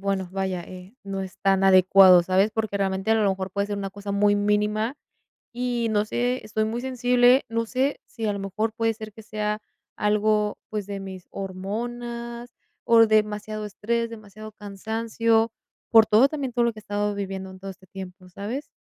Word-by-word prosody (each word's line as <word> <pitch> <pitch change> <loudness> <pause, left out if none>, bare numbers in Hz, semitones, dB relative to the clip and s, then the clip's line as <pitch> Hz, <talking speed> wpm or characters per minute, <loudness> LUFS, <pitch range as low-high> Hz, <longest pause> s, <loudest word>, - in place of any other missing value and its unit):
bueno, 195 -2 -1
vaya, 190 -2 -2
eh, 185 +3 -11
no 195 -1 -3
es 190 -1 -9
tan 195 0 +2
adecuado, 185 -1 +7
¿sabes? 190 +4 +2
Porque 220 -2 -2
realmente 190 +2 -1
a - - +4
lo 210 -2 +3
mejor 190 0 -3
puede 200 +2 -1
ser 205 -1 -3
una 195 -1 -4
cosa 200 0 -6
muy 205 0 +3
mínima 210 +3 +1 0.6
y 240 -1 -1
no 210 -1 +2
sé, 245 +2 -1
estoy 215 0 -1
muy 230 +2 -3
sensible. 250 0 +4
No 230 0 -1
sé 260 +4 0
si 225 -2 -5
a 205 - +1
lo - - -4
mejor 210 +3 -2
puede 225 0 +1
ser 215 -1 -9
que 220 - -12
sea 210 0 -2 0.4
algo, 210 0 +1
pues, 210 -2 -3
de 200 -1 -5
mis 190 -2 -8
hormonas 235 +5 -5 0.3
o 230 -1 +6
demasiado 215 0 0
estrés, 230 +3 -2
demasiado 215 -1 -10
cansancio 225 +2 0 0.4
por 225 -1 +7
todo 230 +6 +5
también, 280 -4 -4
todo 240 - +3
lo 235 - +1
que 220 - -13
he - - -22
estado 205 0 -1
viviendo 190 -1 -5
en 190 0 -13
todo 195 0 -6
este 190 0 -14
tiempo, 185 0 -10
¿sabes? 220 +10 -5
210 Hz, 190 wpm, -25 LUFS, 195-230 Hz, 0.6 s, adecuado